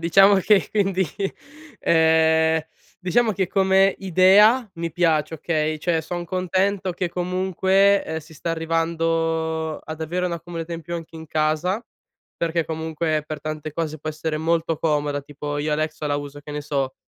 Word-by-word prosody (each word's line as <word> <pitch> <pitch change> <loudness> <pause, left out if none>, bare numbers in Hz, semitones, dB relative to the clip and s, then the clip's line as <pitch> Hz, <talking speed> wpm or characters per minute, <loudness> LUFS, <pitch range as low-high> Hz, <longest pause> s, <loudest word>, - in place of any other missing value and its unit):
diciamo 195 +4 +6
che 195 +1 +3
quindi 195 -3 +1 0.8
ehm, 160 0 +4 0.4
diciamo 220 +5 +2
che 190 -1 0
come 195 0 +3
idea 195 +6 +5
mi 165 0 -3
piace, 160 -2 +1
okay? 155 0 -1
Cioè, 165 +1 0
son 175 +2 -5
contento 185 +1 0
che 175 -1 -3
comunque, 190 +2 +2
ehm, 160 0 -3
si 160 +2 -16
sta 160 +2 -4
arrivando 165 -1 -1
ad 155 0 -7
avere 175 +3 -2
una 170 -2 -2
comodità 170 0 -6
in 165 - -4
più 170 +2 -6
anche 165 -1 -7
in 160 0 -9
casa, 155 +7 0 0.5
perché 165 0 -1
comunque 160 -1 -2
per 155 -1 -5
tante 155 0 -5
cose 155 -2 -3
può 155 - -6
essere 155 0 -3
molto 165 0 0
comoda, 145 -2 0
tipo 145 +1 -6
io 150 +1 -1
Alexa 155 0 -2
la 145 0 0
uso, 145 0 -7
che 145 +1 -9
ne 150 - -4
so, 140 -3 -2
165 Hz, 160 wpm, -23 LUFS, 155-180 Hz, 0.8 s, diciamo